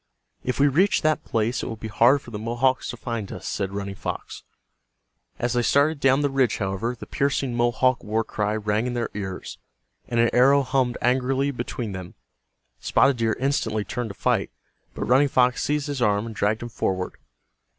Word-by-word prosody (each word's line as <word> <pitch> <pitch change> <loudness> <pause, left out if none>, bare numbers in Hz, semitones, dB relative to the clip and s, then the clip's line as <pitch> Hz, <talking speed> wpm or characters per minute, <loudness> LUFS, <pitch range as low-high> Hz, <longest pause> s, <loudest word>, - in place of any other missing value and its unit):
"If 125 - -2
we 140 - +5
reach 185 +9 +2
that 155 0 +2
place 115 +2 -1
it - - -4
will 115 - -4
be 110 0 -7
hard 120 +6 +4
for 120 - -12
the 105 - -5
Mohawks 120 +4 0
to 120 - -5
find 115 -4 -4
us," 90 - -8
said 95 -2 -2
Running 100 0 -4
Fox. - - -6 1.0
As 120 +1 -1
they 120 - +2
started 145 +5 +2
down 135 +1 +3
the 145 - +1
ridge, 135 -4 +2
however, 95 +5 -2
the - - -7
piercing 135 -2 -1
Mohawk 120 +1 +2
war 110 +1 0
cry 105 -1 -2
rang 110 +2 0
in 125 - -3
their 120 -1 -2
ears, 95 -2 -6 0.5
and 120 -1 -1
an 115 0 +4
arrow 135 +3 +5
hummed 130 -1 0
angrily 130 +3 +1
between 120 -3 -4
them. 95 -2 -8 0.6
Spotted 135 -2 +3
Deer 115 -1 0
instantly 110 -6 0
turned 120 -2 -4
to 100 - -8
fight, - - 0 0.5
but - - -3
Running 135 +4 +4
Fox 125 -2 +2
seized 150 -1 0
his 145 -4 -4
arm 105 -2 +2
and 115 - -6
dragged 105 +3 0
him 120 - -5
forward. 95 -3 -2
120 Hz, 190 wpm, -24 LUFS, 110-135 Hz, 1.0 s, we